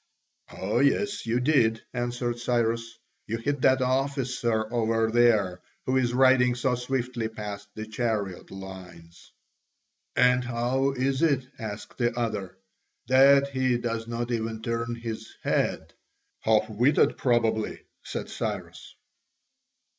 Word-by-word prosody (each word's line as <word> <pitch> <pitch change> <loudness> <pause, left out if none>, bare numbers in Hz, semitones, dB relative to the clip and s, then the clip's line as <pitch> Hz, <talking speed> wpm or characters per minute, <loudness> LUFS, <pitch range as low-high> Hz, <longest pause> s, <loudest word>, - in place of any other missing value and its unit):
"Oh 100 +3 0
yes, 205 - +1
you 115 +2 +1
did," 125 -5 +2
answered 120 -1 -2
Cyrus, 115 -1 -1 0.3
"you 115 - -2
hit 140 +4 -2
that 130 0 +4
officer 125 -4 0
over 115 -1 +1
there 110 -6 +3 0.2
who 130 - 0
is 120 -2 +1
riding 130 -1 +5
so 125 +1 0
swiftly 125 -2 -2
paste 105 -2 -7
the 110 - -5
chariot 110 -4 -2
lines." 95 -3 -11 0.8
"And 125 0 +4
how 125 +3 0
is 135 +2 0
it," 140 -6 +2
asked 110 +1 -7
the 120 -1 0
other, 105 -6 -3 0.5
"that 140 +2 +6
he 130 -2 +1
does 115 -1 -3
not 120 +1 -3
even 110 -1 -3
turn 115 0 -2
his 115 -1 -6
head?" - - 0 0.5
"Half 110 -1 +2
witted, 120 +7 +3
probably," 115 -3 +1 0.2
said - - -5
Cyrus. - - -5
120 Hz, 125 wpm, -27 LUFS, 110-130 Hz, 0.8 s, that